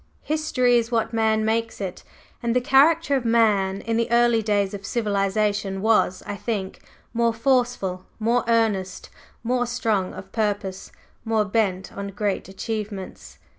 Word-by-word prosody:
History 265 -6 +2
is 230 0 -3
what 225 0 0
man 220 -1 +2
makes 225 +1 -1
it; 190 -2 -5 0.4
and 235 -1 -1
the - - +5
character 285 +4 +4
of 265 - 0
man 210 -4 +2
in 225 0 -1
the 230 +1 0
early 235 -1 +4
days 205 -2 0
of 200 -1 -6
civilization 205 -2 0
was, 210 -3 +2
I 205 - -4
think, 200 -3 -4 0.3
more 230 -1 +1
forceful, 235 -7 0
more 235 +2 +1
earnest, 215 -5 0 0.3
more 245 +1 0
strong 220 -6 -1
of 190 - -10
purpose, 205 -3 -2 0.3
more 220 -2 +1
bent 195 -3 -1
on 200 0 -4
great 200 -1 -2
achievements." 205 -1 -6
220 Hz, 145 wpm, -23 LUFS, 200-235 Hz, 0.4 s, the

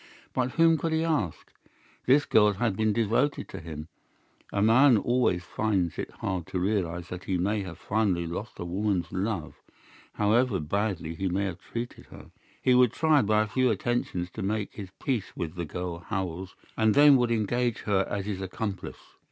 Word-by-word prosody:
But 125 -1 -1
whom 165 -1 +4
could 165 -1 -1
he 160 0 +1
ask? 150 - -2 0.5
This 140 +3 +5
girl 105 -1 +4
had 105 0 0
been 110 +1 +1
devoted 115 +6 +1
to - - -7
him. 80 -1 -8 0.6
A 100 - -1
man 115 +4 +6
always 120 -6 +1
finds 95 -4 -1
it - - -3
hard 90 -3 -4
to 90 - -2
realize 90 -3 -1
that 90 0 -7
he 95 - 0
may 100 +4 0
have 95 -3 -7
finally 100 -5 0
lost 100 +7 -6
a - - -5
woman's 90 -2 -1
love, 95 -5 -3 0.5
however 105 0 +2
badly 90 0 -2
he 95 +3 -2
may 95 +3 0
have 95 -2 -4
treated 120 +1 -6
her. - - -13 0.3
He 130 - +4
would 125 -2 +5
try 155 -3 +4
by 110 +1 +3
a - - -4
few 130 +3 +2
attentions 105 -5 -1
to 110 - -7
make 105 +1 -2
his 100 -3 -8
peace 125 -8 -2
with 80 -2 -4
the 85 -2 -4
girl 90 +1 -5
Howells, 95 -1 -4 0.2
and 110 -1 +3
then 145 0 +8
would 120 -1 +1
engage 115 +1 0
her 95 -2 +1
as 100 -2 -3
his 100 -2 -3
accomplice. 95 0 -4
105 Hz, 185 wpm, -27 LUFS, 90-120 Hz, 0.6 s, then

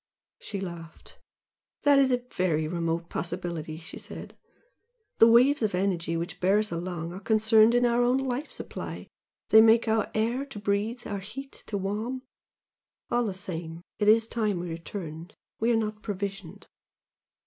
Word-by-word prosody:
She 200 - -5
laughed. 170 -3 -9 0.6
"That 285 -1 +6
is 265 -1 +4
a 250 - +4 0.2
very 160 -4 +1
remote 170 0 -2
possibility!" 170 -3 -4
she 165 +1 -9
said - - -9 0.8
"The 225 - +9
waves 250 +5 +5
of 210 -4 +1
energy 175 -3 0
which 170 +1 -5
bear 190 +3 +3
us 215 0 +1
along 170 0 -4
are 185 - -7
concerned 220 +2 +4
in 245 0 +4
our 240 0 +3
own 245 +2 +3
life 270 +2 -3
supply, - - -7 0.4
they 220 - +9
make 225 +1 +5
our 220 -1 +1
air 230 +5 0
to 270 -5 -10
breathe 205 +4 -1
our 200 -1 -3
heat 270 +8 -8 0.2
to 205 - -2
warm. 215 +7 -3 0.9
All 240 0 +2
the 200 -4 -2
same 170 -2 -5 0.2
it 210 - +1
is 220 +1 +6
time 215 -5 -1
we 175 0 -4
returned 165 0 -7 0.2
we 230 +2 +2
are - - +3
not 215 -1 -2
provisioned." 200 -4 -5
205 Hz, 160 wpm, -27 LUFS, 175-230 Hz, 0.9 s, The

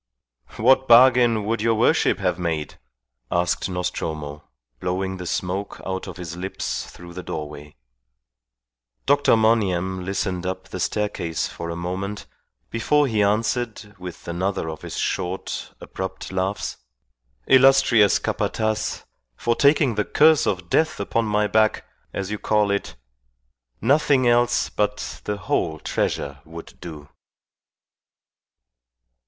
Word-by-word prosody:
"What 130 +3 +4
bargain 120 -3 +6
would 115 0 -1
your 115 0 +2
worship 115 - +3
have - - -1
made?" 80 -4 -3 0.5
asked 90 +2 0
Nostromo, 80 -5 -4 0.4
blowing 95 +1 -2
the 90 -1 -6
smoke 95 +4 -3
out 95 0 -3
of - - -8
his 85 -2 -6
lips 95 +2 -4
through 85 0 -12
the 90 - -6
doorway. 75 -3 -7 1.3
Dr. 145 -4 +4
Monygham 95 -5 +1
listened 95 -1 -2
up 95 - -4
the - - -6
staircase 100 -6 -1
for 85 - -7
a 85 - -3
moment 95 +4 -4 0.5
before 145 +6 +2
he 110 -5 +1
answered, 105 +1 0
with 90 -2 -9
another 85 -1 -2
of 80 - -9
his - - -7
short, 90 +2 -3
abrupt 95 0 -6
laughs 95 +2 -2 0.7
"Illustrious 130 -5 +5
Capataz, 110 -1 -2 0.3
for 120 - 0
taking 140 -2 +4
the 105 - 0
curse 155 +7 +4
of 95 -3 -1
death 160 - +1
upon 115 0 0
my 105 0 +1
back, 110 +1 +2 0.3
as 100 0 -4
you 105 - -3
call 105 -2 +2
it, 100 - -2 0.8
nothing 135 +1 +3
else 120 0 +3
but 105 0 -2
the 105 0 -2
whole 85 -5 -1
treasure 70 -2 -2
would 80 +1 -11
do." 75 -4 -9
100 Hz, 125 wpm, -23 LUFS, 90-115 Hz, 1.3 s, bargain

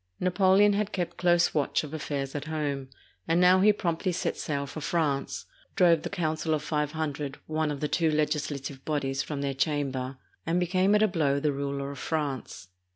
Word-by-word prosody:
Napoleon 190 +2 +4
had 210 0 -1
kept 175 -3 -3
close 175 -1 +3
watch 150 0 +1
of 150 0 -8
affairs 140 -3 -3
at 145 0 -4
home, 145 -4 -3 0.4
and 165 +1 +3
now 180 +1 +6
he 210 +3 +6
promptly 180 -2 -1
set 170 - -1
sail 140 -2 -2
for 155 +3 -7
France, 150 -3 -1 0.3
drove 170 -3 +5
the - - -4
Council 160 -1 -1
of 150 - -4
Five 150 -1 -1
Hundred, 145 -3 -3
one 155 0 -1
of 145 -2 -4
the 150 - +1
two 165 +1 +1
legislative 150 -3 -2
bodies, 135 -3 -1
from 145 -1 -4
their 140 -1 -1
chamber, 135 -2 -1 0.3
and 170 +2 +1
became 185 +3 +2
at 210 - +4
a - - +5
blow 145 -7 +1
the 150 +1 +1
ruler 140 0 -3
of 140 - -9
France. 140 - -3
155 Hz, 190 wpm, -28 LUFS, 140-170 Hz, 0.4 s, now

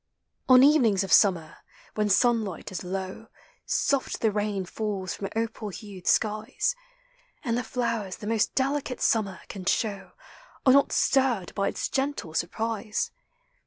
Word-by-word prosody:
On 255 0 +8
evenings 245 -10 +4
of 190 - -1
summer, 175 -6 +4 0.4
when 210 -1 0
sunlight 215 -3 +1
is 190 - -5
low. 190 +4 -5 0.4
Soft 275 -2 0
the 220 - +3
rain 205 -2 -2
falls 195 -1 -3
from 195 - -5
opal 225 -1 -3
hued 200 -2 -10
skies: 220 - +1 0.7
And 235 -5 0
the 245 - -1
flowers 230 -5 -2
the - - -10
most 220 0 0
delicate 275 -1 -1
summer 200 -4 0
can 190 -2 -8
show 200 0 -1 0.5
Are 260 - +7
not 280 0 +4
stirred 250 -10 +1
by 200 -1 0
its - - -2
gentle 270 - -2
surprise. 215 +5 -2
215 Hz, 140 wpm, -27 LUFS, 195-245 Hz, 0.7 s, On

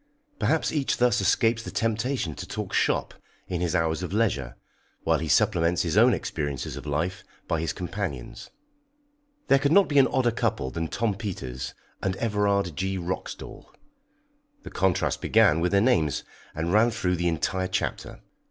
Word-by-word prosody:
Perhaps 160 - +1
each 145 -4 0
thus 125 0 +3
escapes 115 -1 +2
the - - -7
temptation 115 - -1
to - - -8
talk - - -5
"shop" - - +1 0.3
in 90 -1 -3
his 90 0 0
hours 80 -1 +1
of 90 - -4
leisure, 70 - 0 0.5
while - - +2
he 80 - -3
supplements 90 -3 +2
his - - -1
own - - +6
experiences 70 -5 -3
of - - -8
life 85 +6 -2 0.2
by 80 - 0
his 80 - -1
companion's. 90 - -5 1.0
There 135 - +5
could 140 +1 +1
not 200 +2 +6
be 145 -2 +4
an 135 - +6
odder 125 -2 +1
couple 65 - -1
than 80 0 -3
Tom 110 +5 -1
Peters 95 - -5 0.3
and 95 -1 -1
Everard 100 -5 0
G. 95 +4 -2
Roxdal 90 +1 -6 1.0
the - - -9
contrast 95 -2 0
began 75 +2 +4
with 85 +1 +1
their 100 0 +4
names, 85 - +2 0.3
and 80 +3 -1
ran 110 +3 +5
through 90 -5 -1
the 85 +1 0
entire 95 +3 0
chapter. - - -3
95 Hz, 165 wpm, -26 LUFS, 80-115 Hz, 1.0 s, own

